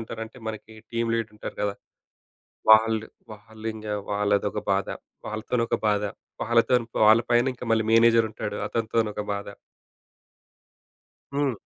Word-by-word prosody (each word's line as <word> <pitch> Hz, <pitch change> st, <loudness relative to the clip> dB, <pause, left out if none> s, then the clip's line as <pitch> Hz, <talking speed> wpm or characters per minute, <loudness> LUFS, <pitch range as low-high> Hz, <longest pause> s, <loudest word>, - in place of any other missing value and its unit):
ఉంటారో 115 Hz, 0 st, -6 dB
అంటే, 110 Hz, +3 st, -14 dB
మనకి 110 Hz, 0 st, -7 dB, 0.2 s
టీమ్ 115 Hz, 0 st, 0 dB
లీడర్ 115 Hz, -2 st, -2 dB
ఉంటారు -, -, -7 dB
గదా! 100 Hz, -1 st, 0 dB, 1.0 s
వాళ్ళు, 110 Hz, 0 st, +5 dB, 0.3 s
వాళ్ళింగ 110 Hz, +1 st, -8 dB, 0.2 s
వాళ్ళదొక 100 Hz, 0 st, +1 dB
బాధ, 100 Hz, 0 st, +1 dB, 0.4 s
వాళ్ళతోనొక 115 Hz, +2 st, -1 dB
బాధ. 105 Hz, -1 st, +2 dB, 0.4 s
వాళ్ళతోని 120 Hz, +1 st, +3 dB, 0.2 s
వాళ్ళ 110 Hz, +2 st, +7 dB
పైన 120 Hz, +1 st, +4 dB
ఇంకా 125 Hz, -, -8 dB
మళ్ళీ 110 Hz, -1 st, +3 dB
మేనేజర్ 115 Hz, 0 st, +6 dB
ఉంటాడు. 105 Hz, -1 st, -5 dB
అతనితోని 115 Hz, -1 st, 0 dB
ఒక 105 Hz, -, -4 dB
బాధ. 100 Hz, 0 st, -4 dB, 1.9 s
హ్మ్. 140 Hz, -3 st, +1 dB
110 Hz, 125 wpm, -25 LUFS, 105-115 Hz, 1.9 s, వాళ్ళ